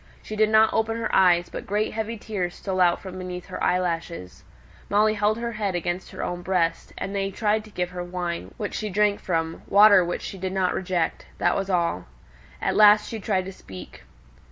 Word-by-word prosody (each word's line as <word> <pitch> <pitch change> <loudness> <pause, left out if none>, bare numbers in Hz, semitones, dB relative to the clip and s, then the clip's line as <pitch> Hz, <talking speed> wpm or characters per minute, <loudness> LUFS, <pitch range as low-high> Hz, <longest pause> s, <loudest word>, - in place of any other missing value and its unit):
She 215 - -6
did 215 0 +3
not 220 0 +5
open 225 0 0
her 230 - -3
eyes, 175 -2 +4
but - - -7
great 210 +2 -1
heavy 225 +1 -3
tears 190 -5 -4
stole 190 -2 -2
out 175 -1 +4
from 185 -1 -8
beneath 180 -1 -6
her - - -6
eyelashes. 170 - -2 0.5
Molly 215 +1 +3
held 210 +1 +1
her 235 0 -3
head 205 -4 -2
against 175 +1 -3
her - - -6
own 175 0 -3
breast; 175 -2 -1
and 195 - -4
they 195 0 -1
tried 210 +2 0
to - - -13
give 180 -3 -3
her 180 -1 -5
wine, 175 -1 -4
which 210 -3 -4
she 215 -2 -3
shrank 205 +1 +2
from 165 -2 -2
water, 200 -2 +7
which 175 0 -3
she 195 - -7
did 185 0 -3
not 185 -1 +1
reject; 175 -3 -2
that - - +2
was 195 0 -2
all. 170 - 0 0.5
At - - -1
last 210 0 +6
she 225 - -5
tried 190 -3 -1
to 190 - -7
speak. 95 - -12
190 Hz, 205 wpm, -24 LUFS, 175-210 Hz, 0.5 s, water